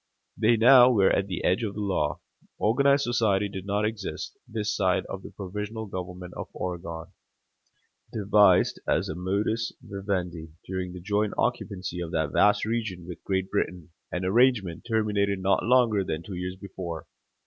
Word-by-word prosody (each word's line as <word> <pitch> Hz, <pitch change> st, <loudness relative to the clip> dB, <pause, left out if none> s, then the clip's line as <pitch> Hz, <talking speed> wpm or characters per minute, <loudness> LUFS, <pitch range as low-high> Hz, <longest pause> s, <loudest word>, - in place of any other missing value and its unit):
They 115 Hz, +2 st, +3 dB
now 125 Hz, +2 st, +8 dB
were 100 Hz, -6 st, +4 dB
at 100 Hz, -, +1 dB
the 90 Hz, -3 st, -4 dB
edge 90 Hz, +4 st, +2 dB
of 105 Hz, -3 st, -3 dB
the -, -, -5 dB
law. 90 Hz, -8 st, -1 dB, 0.4 s
Organized 140 Hz, +6 st, +3 dB
society 110 Hz, -4 st, +2 dB
did 95 Hz, -1 st, -7 dB
not 105 Hz, +1 st, +1 dB
exist 105 Hz, -2 st, -4 dB
this 110 Hz, -1 st, -2 dB
side 95 Hz, -3 st, +1 dB
of 95 Hz, -, -6 dB
the -, -, -9 dB
provisional 105 Hz, +3 st, -5 dB
government 90 Hz, -2 st, -7 dB
of -, -, -5 dB
Oregon, 85 Hz, -1 st, -5 dB, 1.0 s
devised 105 Hz, -3 st, +4 dB
as -, -, +1 dB
a -, -, -2 dB
modus 100 Hz, +5 st, -1 dB
vivendi 90 Hz, -5 st, -4 dB
during 95 Hz, -1 st, -4 dB
the 90 Hz, -, -8 dB
joint 105 Hz, +2 st, 0 dB
occupancy 95 Hz, -7 st, -2 dB
of 85 Hz, -, -4 dB
that 80 Hz, -2 st, 0 dB
vast 105 Hz, 0 st, +4 dB
region 110 Hz, -6 st, -3 dB
with 90 Hz, -1 st, -9 dB
Great 95 Hz, -1 st, -1 dB
Britain 90 Hz, -2 st, -2 dB, 0.2 s
an 90 Hz, +1 st, -2 dB
arrangement 105 Hz, -4 st, +2 dB
terminated 105 Hz, -3 st, +1 dB
not 95 Hz, +1 st, +1 dB
longer 115 Hz, -4 st, +3 dB
than 80 Hz, -2 st, -4 dB
two 100 Hz, -, -8 dB
years 90 Hz, +1 st, -4 dB
before. 90 Hz, -4 st, -7 dB
100 Hz, 160 wpm, -27 LUFS, 90-110 Hz, 1.0 s, now